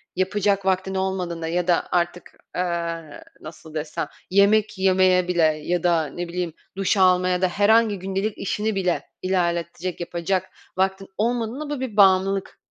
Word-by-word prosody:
yapacak 195 Hz, +1 st, +1 dB
vaktin 190 Hz, 0 st, 0 dB
olmadığında 180 Hz, -3 st, -2 dB
ya 175 Hz, +1 st, -1 dB
da 175 Hz, -2 st, +3 dB
artık, 175 Hz, 0 st, -1 dB, 0.2 s
eee, 170 Hz, -3 st, -3 dB, 0.2 s
nasıl 160 Hz, 0 st, -11 dB
desem? 155 Hz, -1 st, -3 dB, 0.2 s
Yemek 200 Hz, +2 st, +3 dB
yemeye 185 Hz, -1 st, +3 dB
bile 175 Hz, -2 st, +2 dB
ya 155 Hz, +2 st, +1 dB
da 170 Hz, -3 st, +2 dB
ne 175 Hz, +4 st, -5 dB
bileyim 175 Hz, -1 st, -3 dB, 0.2 s
duş 195 Hz, +1 st, +1 dB
almaya 180 Hz, -1 st, +3 dB
da 185 Hz, -, +4 dB
herhangi 205 Hz, +2 st, +3 dB
gündelik 195 Hz, +3 st, -2 dB
işini 210 Hz, +2 st, -2 dB
bile 180 Hz, -3 st, 0 dB, 0.2 s
ilerletecek, 175 Hz, -1 st, -1 dB
yapacak 175 Hz, +2 st, -2 dB, 0.3 s
vaktin 190 Hz, +1 st, 0 dB
olmadığında 240 Hz, +6 st, -1 dB
bu 295 Hz, -2 st, -3 dB
bir 250 Hz, -5 st, -5 dB
bağımlılık 195 Hz, 0 st, +3 dB
185 Hz, 140 wpm, -23 LUFS, 175-195 Hz, 0.3 s, da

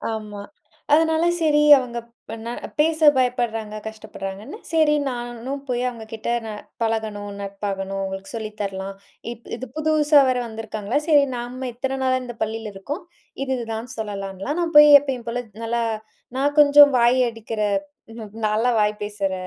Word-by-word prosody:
ஆமா. 210 Hz, -2 st, -7 dB, 0.5 s
அதனால 320 Hz, +1 st, +3 dB, 0.2 s
சரி 295 Hz, -2 st, +4 dB, 0.2 s
அவங்க 245 Hz, -2 st, -4 dB, 0.3 s
ப்ப 225 Hz, -, -4 dB
நான் 235 Hz, -, -4 dB, 0.2 s
பேச 320 Hz, +1 st, +2 dB, 0.2 s
பயப்படுறாங்க, 240 Hz, -4 st, -1 dB
கஷ்டப்படுறாங்கன்னு, 215 Hz, -, -7 dB
சரி 310 Hz, -2 st, +4 dB
நானும் 240 Hz, +2 st, -5 dB
போய் 245 Hz, -1 st, -1 dB
அவங்க 230 Hz, -2 st, -9 dB
கிட்ட 220 Hz, +1 st, -4 dB, 0.2 s
ந -, -, -5 dB, 0.3 s
பழகணும், 220 Hz, -2 st, -2 dB
நட்பாகணும், 195 Hz, -1 st, -4 dB
உங்களுக்கு 190 Hz, 0 st, -6 dB
சொல்லி 220 Hz, -1 st, -4 dB
தரலாம். 195 Hz, 0 st, -4 dB, 0.4 s
இப்போ 235 Hz, 0 st, -11 dB
இது 250 Hz, -, -6 dB
புதுசா 305 Hz, -1 st, +4 dB
வேற 255 Hz, -, +1 dB
வந்திருக்காங்களா, 220 Hz, +1 st, -4 dB
சரி 295 Hz, -3 st, +6 dB
நாம 250 Hz, +2 st, -5 dB
இத்தன 265 Hz, +2 st, -3 dB
நாளா 255 Hz, 0 st, +2 dB
இந்த 240 Hz, -2 st, -8 dB
பள்ளியில 220 Hz, 0 st, -3 dB
இருக்கோம். 280 Hz, -, -6 dB, 0.4 s
இது 270 Hz, -, -4 dB
இதுதான் 225 Hz, 0 st, -5 dB
சொல்லலாம்ன்லாம் 200 Hz, -, -4 dB
நான் 335 Hz, -2 st, -2 dB
போய் 295 Hz, 0 st, +10 dB
எப்பயும் 265 Hz, -4 st, -5 dB
போல, 245 Hz, +1 st, -2 dB, 0.2 s
நல்லா, 235 Hz, +1 st, 0 dB, 0.5 s
"நான் 285 Hz, +2 st, +1 dB
கொஞ்சம் 290 Hz, 0 st, +8 dB
வாய் 240 Hz, +2 st, +4 dB
அடிக்கிற 225 Hz, -1 st, -6 dB, 0.5 s
ம் 220 Hz, -3 st, -9 dB, 0.2 s
நல்லா 220 Hz, +3 st, +1 dB
வாய் 210 Hz, 0 st, +2 dB
பேசுற 205 Hz, -2 st, -2 dB
235 Hz, 150 wpm, -22 LUFS, 210-270 Hz, 0.5 s, போய்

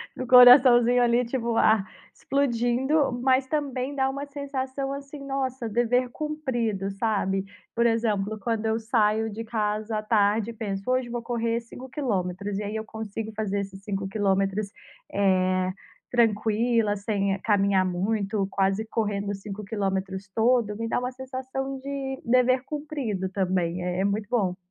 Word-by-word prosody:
do 255 Hz, -, -4 dB
coraçãozinho 245 Hz, -1 st, +8 dB
ali, 240 Hz, +1 st, +3 dB
tipo 235 Hz, -2 st, -2 dB
ah, 215 Hz, -3 st, +4 dB, 0.3 s
explodindo. 265 Hz, +2 st, +1 dB
Mas 260 Hz, 0 st, +3 dB
também 275 Hz, -2 st, -2 dB
dá 265 Hz, -1 st, +1 dB
uma 275 Hz, +1 st, -4 dB
sensação 275 Hz, -1 st, -4 dB
assim, 280 Hz, +1 st, -8 dB
nossa, 260 Hz, -3 st, -2 dB
dever 240 Hz, +3 st, +1 dB
cumprido, 240 Hz, -10 st, -2 dB
sabe? 195 Hz, -2 st, 0 dB, 0.3 s
Por 235 Hz, 0 st, +2 dB
exemplo, 220 Hz, -2 st, 0 dB
quando 225 Hz, 0 st, -2 dB
eu 220 Hz, 0 st, +1 dB
saio 220 Hz, -1 st, +1 dB
de 220 Hz, +2 st, -6 dB
casa 215 Hz, -1 st, -2 dB
à -, -, -1 dB
tarde 215 Hz, 0 st, +2 dB
e -, -, -11 dB
penso: 200 Hz, -2 st, -4 dB
"Hoje 255 Hz, -1 st, +1 dB
vou 240 Hz, 0 st, -3 dB
correr 230 Hz, -1 st, -1 dB
5 245 Hz, +2 st, -11 dB
quilômetros". 200 Hz, -, -2 dB
E -, -, -3 dB
aí 210 Hz, +2 st, -3 dB
eu 220 Hz, -, -5 dB
consigo 220 Hz, 0 st, -6 dB
fazer 205 Hz, -2 st, -1 dB
esses 195 Hz, -1 st, -7 dB
5 195 Hz, -1 st, -3 dB
quilômetros, 195 Hz, 0 st, 0 dB, 0.4 s
eh, 185 Hz, -2 st, +2 dB, 0.4 s
tranquila, 225 Hz, -1 st, +2 dB
sem 200 Hz, -1 st, -1 dB
caminhar 200 Hz, -3 st, +2 dB
muito, 195 Hz, +2 st, -1 dB
quase 195 Hz, +2 st, 0 dB
correndo 205 Hz, -2 st, -2 dB
5 200 Hz, +1 st, -8 dB
quilômetros 195 Hz, -2 st, -3 dB
todo, 225 Hz, -2 st, +2 dB
me 230 Hz, +1 st, -3 dB
dá -, -, 0 dB
uma 250 Hz, +1 st, -3 dB
sensação 260 Hz, +1 st, -5 dB
de 270 Hz, 0 st, -5 dB
dever 255 Hz, +1 st, +3 dB
cumprido 285 Hz, -, -3 dB
também. 185 Hz, -2 st, -1 dB
É 180 Hz, 0 st, -2 dB
é -, -, +1 dB
muito 205 Hz, +1 st, -1 dB
bom. 195 Hz, -7 st, +1 dB
225 Hz, 150 wpm, -26 LUFS, 200-255 Hz, 0.4 s, coraçãozinho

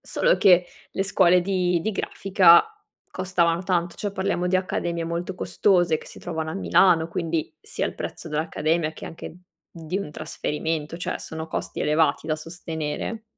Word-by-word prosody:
Solo -, -, +1 dB
che 180 Hz, -3 st, +5 dB, 0.2 s
le 195 Hz, -, -1 dB
scuole 180 Hz, -2 st, +4 dB
di 180 Hz, -2 st, +1 dB
di 220 Hz, -, 0 dB
grafica 190 Hz, -3 st, +5 dB, 0.5 s
costavano 180 Hz, -2 st, 0 dB
tanto, 175 Hz, -2 st, -1 dB
cioè 205 Hz, -2 st, -3 dB
parliamo 190 Hz, -2 st, -1 dB
di 180 Hz, -, 0 dB
accademie 175 Hz, -2 st, -2 dB
molto 170 Hz, +3 st, -3 dB
costose 180 Hz, -3 st, +2 dB
che -, -, -14 dB
si -, -, -12 dB
trovano 160 Hz, -2 st, -4 dB
a -, -, -5 dB
Milano, 160 Hz, -, +3 dB
quindi 165 Hz, -2 st, -3 dB
sia -, -, -3 dB
il -, -, -6 dB
prezzo 165 Hz, -, -6 dB
dell'accademia 155 Hz, +1 st, -1 dB
che -, -, -10 dB
anche 165 Hz, 0 st, -9 dB, 0.3 s
di 165 Hz, +2 st, -4 dB
un 200 Hz, -7 st, -5 dB
trasferimento, 155 Hz, +1 st, -3 dB
cioè, 180 Hz, -, -3 dB
sono 160 Hz, 0 st, -6 dB
costi -, -, -4 dB
elevati 155 Hz, 0 st, +2 dB
da 155 Hz, -1 st, 0 dB
sostenere. 165 Hz, +5 st, -5 dB
170 Hz, 160 wpm, -24 LUFS, 160-185 Hz, 0.5 s, che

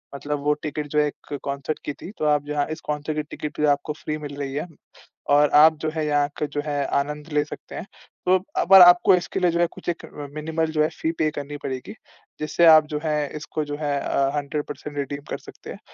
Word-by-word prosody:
मतलब 145 Hz, +1 st, -3 dB
वो 150 Hz, 0 st, +3 dB
टिकट 150 Hz, 0 st, -3 dB
जो 150 Hz, -, +3 dB
है 150 Hz, -, +4 dB
एक 145 Hz, -, -9 dB
कंसर्ट 140 Hz, +2 st, -3 dB
की 145 Hz, -, -2 dB
थी, 180 Hz, -, -10 dB
तो 155 Hz, -, -2 dB
आप 150 Hz, -1 st, +2 dB
यहाँ 145 Hz, -1 st, 0 dB
इस 160 Hz, -, -5 dB
कंसर्ट 150 Hz, +1 st, -2 dB
की 150 Hz, -, 0 dB
टिकट 150 Hz, 0 st, -2 dB
आपको 140 Hz, +2 st, -4 dB
फ्री 155 Hz, -1 st, -4 dB
मिल 145 Hz, -2 st, -7 dB
रही 135 Hz, -1 st, -4 dB
है, 150 Hz, +5 st, -3 dB, 0.6 s
और 145 Hz, +1 st, +5 dB
आप 160 Hz, 0 st, +7 dB
जो 155 Hz, -, 0 dB
है 155 Hz, -1 st, -1 dB
यहाँ 145 Hz, -1 st, +2 dB
का 150 Hz, -, -1 dB
जो 145 Hz, 0 st, -3 dB
है 145 Hz, -1 st, -1 dB, 0.2 s
आनंद 150 Hz, +2 st, -5 dB
ले 150 Hz, 0 st, +3 dB
सकते -, -, -10 dB
हैं। -, -, -5 dB, 0.4 s
तो 185 Hz, -, +5 dB, 0.2 s
अब -, -, 0 dB
पर 195 Hz, -1 st, +10 dB
आपको 175 Hz, +1 st, +8 dB
इसके 180 Hz, +2 st, -2 dB
लिए 180 Hz, -2 st, +3 dB
जो 170 Hz, -, -1 dB
है 175 Hz, -, +4 dB
कुछ -, -, -14 dB
एक 170 Hz, -, -3 dB
अ, 145 Hz, -1 st, -8 dB
मिनिमल 160 Hz, +1 st, -1 dB
जो 155 Hz, -1 st, +1 dB
है -, -, +3 dB
फ़ी 160 Hz, -, +1 dB
पे 155 Hz, -, +3 dB
करनी 145 Hz, 0 st, -6 dB
पड़ेगी, 130 Hz, -1 st, -5 dB, 0.5 s
जिससे 155 Hz, +3 st, +2 dB
आप 155 Hz, -1 st, +8 dB
जो 150 Hz, -1 st, -3 dB
है 155 Hz, -1 st, 0 dB, 0.2 s
इसको 150 Hz, +1 st, -4 dB
जो 145 Hz, -, -4 dB
है 145 Hz, -2 st, -1 dB
अ, 135 Hz, 0 st, +1 dB
100% 145 Hz, 0 st, -4 dB
रिडीम 140 Hz, 0 st, -3 dB
कर -, -, -3 dB
सकते -, -, -13 dB
हैं।" -, -, -9 dB
150 Hz, 240 wpm, -24 LUFS, 145-155 Hz, 0.6 s, पर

